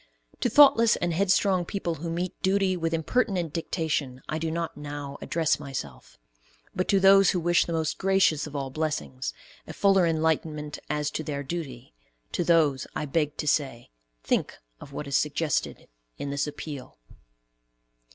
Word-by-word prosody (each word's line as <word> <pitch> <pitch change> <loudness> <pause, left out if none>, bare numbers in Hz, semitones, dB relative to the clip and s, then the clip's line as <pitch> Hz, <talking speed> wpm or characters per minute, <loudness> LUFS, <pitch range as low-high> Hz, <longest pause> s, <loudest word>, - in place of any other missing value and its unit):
To 245 - +1
thoughtless 230 -4 +6
and 175 -1 -1
headstrong 190 0 +2
people 175 -1 -3
who 170 - -3
meet 175 +2 -2
duty 190 0 +2
with 165 -2 -2
impertinent 170 0 0
dictation 155 -6 -2
I 155 - -2
do 165 0 -2
not 165 +1 -3
now 145 -1 -7
address 165 -3 0
myself; 135 - -7 0.6
but 185 - -1
to 195 - +3
those 195 0 +6
who 180 - +1
wish 175 +1 +3
the 170 - -4
most 160 -1 -1
gracious 190 -6 +2
of 150 - -10
all 135 -2 -3
blessings, 130 - -3 0.4
a - - -7
fuller 195 -3 +4
enlightment 155 -2 -1
as 150 -1 -1
to 155 - -3
their 145 -2 -4
duty, 135 - -6 0.4
to - - 0
those 155 -6 +3
I - - -2
beg 150 0 -1
to 150 - -4
say, 135 - -1 0.3
think - - 0 0.2
of 140 - -12
what 150 - -5
is 140 -1 -2
suggested 150 0 -1 0.3
in 140 - -4
this 140 +1 -1
appeal. 145 -2 -8
160 Hz, 160 wpm, -27 LUFS, 145-175 Hz, 0.6 s, thoughtless